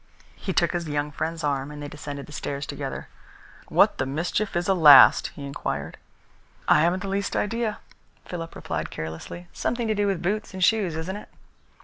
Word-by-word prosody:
He 195 Hz, -, -4 dB
took 170 Hz, -2 st, +2 dB
his 175 Hz, -3 st, -3 dB
young 145 Hz, 0 st, -1 dB
friend's 160 Hz, +2 st, -4 dB
arm, 140 Hz, -1 st, -1 dB
and 150 Hz, 0 st, -9 dB
they 145 Hz, -, -5 dB
descended 145 Hz, -1 st, -7 dB
the -, -, -14 dB
stairs 140 Hz, -1 st, -4 dB
together. -, -, -5 dB, 0.6 s
"What -, -, +3 dB
the 130 Hz, -, 0 dB
mischief 170 Hz, +9 st, -2 dB
is 175 Hz, +1 st, 0 dB
a 195 Hz, -, +4 dB
last?" 150 Hz, -6 st, +8 dB
he 140 Hz, -, -7 dB
inquired. 140 Hz, -, -4 dB, 0.7 s
"I 150 Hz, -, +6 dB
haven't 175 Hz, +3 st, +1 dB
the -, -, -4 dB
least 200 Hz, +1 st, -2 dB
idea," 225 Hz, 0 st, -1 dB, 0.5 s
Philip 165 Hz, -2 st, -6 dB
replied -, -, -4 dB
carelessly. 80 Hz, -, -7 dB
"Something 235 Hz, -1 st, -2 dB
to 215 Hz, -, +2 dB
do 205 Hz, -1 st, 0 dB
with 190 Hz, -3 st, -1 dB
boots 205 Hz, +2 st, -2 dB
and 185 Hz, -, -1 dB
shoes, 195 Hz, -6 st, +3 dB
isn't 170 Hz, +5 st, -4 dB
it?" 210 Hz, -, -11 dB
170 Hz, 190 wpm, -25 LUFS, 145-195 Hz, 0.7 s, last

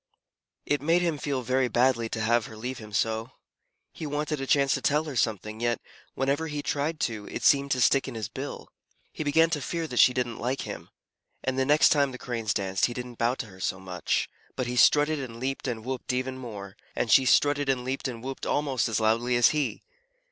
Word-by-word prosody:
It 145 Hz, -2 st, 0 dB
made 165 Hz, +4 st, +3 dB
him 165 Hz, -4 st, 0 dB
feel 140 Hz, -3 st, -2 dB
very 130 Hz, +1 st, +1 dB
badly 120 Hz, -2 st, +2 dB
to 110 Hz, -, -3 dB
have 115 Hz, 0 st, +2 dB
her 110 Hz, -, -11 dB
leave 125 Hz, +3 st, -5 dB
him 105 Hz, -1 st, -10 dB
so. 110 Hz, +3 st, -1 dB, 0.6 s
He 155 Hz, -, -6 dB
wanted 150 Hz, 0 st, -2 dB
a 135 Hz, -, -4 dB
chance 140 Hz, -1 st, +3 dB
to 135 Hz, -, -1 dB
tell 150 Hz, +3 st, +2 dB
her 150 Hz, -4 st, -6 dB
something, 110 Hz, -2 st, -1 dB
yet, 120 Hz, -1 st, 0 dB, 0.4 s
whenever 140 Hz, +4 st, 0 dB
he 145 Hz, -1 st, -4 dB
tried 150 Hz, +3 st, -1 dB
to, 110 Hz, -3 st, -2 dB
it -, -, -6 dB
seemed 140 Hz, 0 st, +4 dB
to 130 Hz, -, +1 dB
stick 135 Hz, +3 st, +3 dB
in 130 Hz, -, -6 dB
his 110 Hz, -4 st, -3 dB
bill. -, -, -7 dB, 0.4 s
He -, -, -4 dB
began 160 Hz, +3 st, +3 dB
to 150 Hz, -3 st, -1 dB
fear 165 Hz, +5 st, -3 dB
that 125 Hz, -6 st, -2 dB
she -, -, +8 dB
didn't 125 Hz, -2 st, -2 dB
like 130 Hz, +3 st, -1 dB
him; -, -, -7 dB, 0.5 s
and 130 Hz, 0 st, -1 dB
the 130 Hz, -, +2 dB
next 150 Hz, +1 st, +6 dB
time 140 Hz, -2 st, +3 dB
the -, -, -6 dB
Cranes 115 Hz, -4 st, -3 dB
danced 95 Hz, -1 st, +1 dB
he 120 Hz, -, -7 dB
didn't 125 Hz, -1 st, -7 dB
bow 120 Hz, +2 st, +2 dB
to -, -, -5 dB
her 95 Hz, -3 st, -14 dB
so 95 Hz, 0 st, -2 dB
much, 90 Hz, -2 st, -1 dB, 0.3 s
but 130 Hz, -, -2 dB
he 125 Hz, +1 st, -3 dB
strutted 150 Hz, +4 st, +4 dB
and 120 Hz, -4 st, -7 dB
leaped 135 Hz, +2 st, -3 dB
and 115 Hz, -3 st, -4 dB
whooped 130 Hz, 0 st, -3 dB
even 130 Hz, +1 st, -2 dB
more. 105 Hz, -7 st, -8 dB, 0.2 s
And -, -, 0 dB
she 135 Hz, -, +6 dB
strutted 145 Hz, +2 st, +3 dB
and 130 Hz, -2 st, +1 dB
leaped 135 Hz, +2 st, -2 dB
and 120 Hz, -3 st, -7 dB
whooped 135 Hz, 0 st, -5 dB
almost 135 Hz, -6 st, 0 dB
as 110 Hz, -, 0 dB
loudly 115 Hz, +3 st, +2 dB
as 120 Hz, -1 st, +6 dB
he. 150 Hz, -3 st, -2 dB
130 Hz, 225 wpm, -27 LUFS, 115-145 Hz, 0.6 s, she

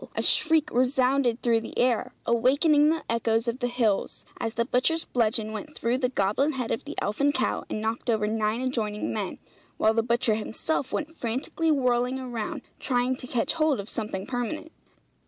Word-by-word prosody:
a -, -, 0 dB
shriek 315 Hz, -1 st, +3 dB
resounded 255 Hz, -1 st, +2 dB
through 230 Hz, -2 st, +3 dB
the 225 Hz, -, -8 dB
air, 245 Hz, -2 st, +2 dB
awakening 285 Hz, +6 st, +4 dB
the 320 Hz, 0 st, 0 dB
echoes 230 Hz, 0 st, +1 dB
of 235 Hz, +2 st, -2 dB
the 245 Hz, -, 0 dB
hills, 235 Hz, -5 st, -1 dB
as 225 Hz, 0 st, -3 dB
the 235 Hz, -, +1 dB
butcher's 275 Hz, +7 st, +1 dB
bludgeon 220 Hz, -2 st, 0 dB
went 300 Hz, +8 st, -7 dB
through 235 Hz, +1 st, 0 dB
the 255 Hz, -1 st, 0 dB
goblin 255 Hz, +7 st, +1 dB
head 250 Hz, -4 st, -3 dB
of 225 Hz, -, -2 dB
the 295 Hz, -, -6 dB
elfin 280 Hz, +8 st, +1 dB
cow, -, -, -1 dB
and 215 Hz, -, -3 dB
knocked 225 Hz, +3 st, -2 dB
over 220 Hz, -2 st, +2 dB
nine 215 Hz, +2 st, 0 dB
adjoining 220 Hz, -5 st, -2 dB
men, 205 Hz, -4 st, -3 dB, 0.4 s
while 220 Hz, -, +3 dB
the 225 Hz, -, +2 dB
butcher 235 Hz, 0 st, +1 dB
himself 225 Hz, +6 st, -2 dB
went 310 Hz, +1 st, -3 dB
frantically 265 Hz, +5 st, -2 dB
whirling 250 Hz, -3 st, +2 dB
around 255 Hz, +2 st, -4 dB, 0.2 s
trying 250 Hz, 0 st, +1 dB
to 255 Hz, -, -8 dB
catch 245 Hz, -2 st, +1 dB
hold 310 Hz, -5 st, +2 dB
of 200 Hz, +3 st, -6 dB
something 210 Hz, -4 st, -3 dB
permanent. 265 Hz, +6 st, -4 dB
245 Hz, 180 wpm, -26 LUFS, 225-270 Hz, 0.4 s, awakening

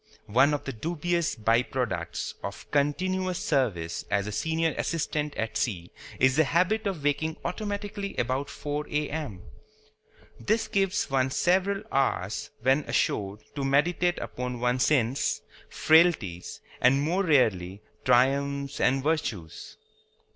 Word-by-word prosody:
One 135 Hz, +7 st, +4 dB
of 145 Hz, -, -5 dB
the 135 Hz, -, -5 dB
dubious 170 Hz, +6 st, -1 dB
by 115 Hz, +1 st, +3 dB
products 95 Hz, -10 st, -3 dB
of 100 Hz, -, -7 dB
continuous 185 Hz, +6 st, 0 dB
service 105 Hz, -, -1 dB
as 100 Hz, -1 st, +1 dB
a 105 Hz, -, -4 dB
senior 160 Hz, +7 st, 0 dB
assistant 150 Hz, -2 st, -2 dB
at 110 Hz, 0 st, -3 dB
sea 90 Hz, -8 st, -2 dB, 0.3 s
is 130 Hz, +2 st, +4 dB
the 160 Hz, -, +6 dB
habit 185 Hz, +9 st, +1 dB
of 180 Hz, -7 st, -3 dB
waking 145 Hz, +2 st, 0 dB
automatically 200 Hz, +1 st, -4 dB
about 130 Hz, +4 st, -1 dB
4 150 Hz, 0 st, -4 dB
A.M. 150 Hz, -, -3 dB, 1.0 s
This 220 Hz, -, 0 dB
gives 195 Hz, -1 st, 0 dB
one 135 Hz, -1 st, +2 dB
several 190 Hz, +7 st, +1 dB
hours, 110 Hz, -7 st, 0 dB
when 135 Hz, +2 st, +4 dB
ashore, 100 Hz, 0 st, 0 dB, 0.2 s
to 140 Hz, -, -3 dB
meditate 170 Hz, +6 st, +2 dB
upon 125 Hz, -1 st, -5 dB
one's 125 Hz, +1 st, +2 dB
sins, 130 Hz, -3 st, +1 dB, 0.3 s
frailties, 155 Hz, -, +2 dB, 0.2 s
and 130 Hz, +2 st, +5 dB
(more 180 Hz, +6 st, +1 dB
rarely) 105 Hz, -, +2 dB, 0.2 s
triumphs 140 Hz, +2 st, +2 dB
and 135 Hz, +1 st, +2 dB
virtues. 115 Hz, -, -3 dB
140 Hz, 125 wpm, -27 LUFS, 120-165 Hz, 1.0 s, the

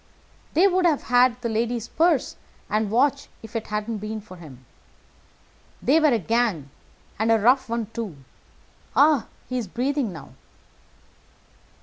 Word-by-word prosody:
"They 360 Hz, +5 st, +6 dB
would 370 Hz, -1 st, +2 dB
have 305 Hz, -4 st, +1 dB
had 245 Hz, 0 st, +3 dB
the -, -, 0 dB
lady's 230 Hz, +1 st, -1 dB
purse 330 Hz, 0 st, +1 dB, 0.4 s
and 215 Hz, 0 st, +1 dB
watch 275 Hz, +5 st, +1 dB, 0.2 s
if 225 Hz, +1 st, -12 dB
it 225 Hz, -, -3 dB
hadn't 210 Hz, +1 st, -3 dB
been 215 Hz, +1 st, -5 dB
for 200 Hz, -3 st, -13 dB
him. 135 Hz, -7 st, -13 dB, 1.1 s
They 290 Hz, +6 st, +3 dB
were 310 Hz, -, +4 dB
a 250 Hz, -5 st, +3 dB
gang, 215 Hz, -, -1 dB, 0.5 s
and 220 Hz, +1 st, +2 dB
a 225 Hz, -, +5 dB
rough 250 Hz, +4 st, +3 dB
one, 230 Hz, -1 st, -1 dB
too. 220 Hz, -8 st, -5 dB, 0.8 s
Ah! 290 Hz, -4 st, +4 dB, 0.2 s
he's 250 Hz, -4 st, -3 dB
breathing 255 Hz, +3 st, -1 dB
now." 160 Hz, -7 st, -11 dB
230 Hz, 140 wpm, -24 LUFS, 215-265 Hz, 1.1 s, They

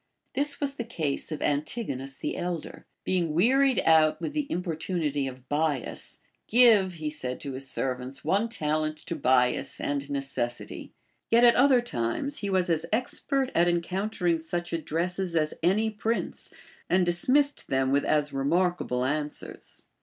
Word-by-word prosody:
This 285 Hz, +2 st, -1 dB
was 280 Hz, -2 st, 0 dB
the 235 Hz, -, -2 dB
case 160 Hz, -11 st, -3 dB
of 155 Hz, -, -3 dB
Antigonus 140 Hz, -, -2 dB
the -, -, -3 dB
elder. 175 Hz, -3 st, -5 dB, 0.2 s
Being 170 Hz, -4 st, 0 dB
wearied 260 Hz, +8 st, +4 dB
out 160 Hz, -1 st, +4 dB
with 295 Hz, -, -4 dB
the 300 Hz, -2 st, -1 dB
importunity 165 Hz, -4 st, -1 dB
of 130 Hz, 0 st, -9 dB
Bias, 145 Hz, -3 st, -1 dB, 0.3 s
Give, 220 Hz, -5 st, +5 dB
said 150 Hz, -6 st, -4 dB
he -, -, -12 dB
to -, -, -3 dB
his 135 Hz, +1 st, -6 dB
servants, 130 Hz, +1 st, -3 dB
one 200 Hz, +8 st, +1 dB
talent 155 Hz, -5 st, -1 dB
to 170 Hz, -, -3 dB
Bias 130 Hz, -1 st, +2 dB
and 145 Hz, -1 st, -1 dB
neces 135 Hz, -4 st, -2 dB
sity. -, -, -9 dB, 0.4 s
A^et 235 Hz, +1 st, +5 dB
at 240 Hz, -1 st, +7 dB
other 255 Hz, -1 st, +5 dB
times 240 Hz, -, -2 dB
he 200 Hz, -, -3 dB
was 185 Hz, -2 st, +2 dB
as 165 Hz, -1 st, 0 dB
expert 260 Hz, +3 st, 0 dB
at 170 Hz, +1 st, +3 dB
encountering 175 Hz, 0 st, 0 dB
such 175 Hz, +2 st, -4 dB
addresses 170 Hz, +2 st, -2 dB
as 155 Hz, -1 st, +2 dB
any 210 Hz, +6 st, +2 dB
prince, 220 Hz, +2 st, -3 dB, 0.4 s
and 185 Hz, 0 st, +3 dB
dismissed 260 Hz, +12 st, +2 dB
them 130 Hz, 0 st, +1 dB
with 140 Hz, +1 st, +3 dB
as 150 Hz, -1 st, +1 dB
remarkable 140 Hz, -3 st, 0 dB
answers. 150 Hz, +2 st, -4 dB
165 Hz, 155 wpm, -27 LUFS, 145-210 Hz, 0.4 s, at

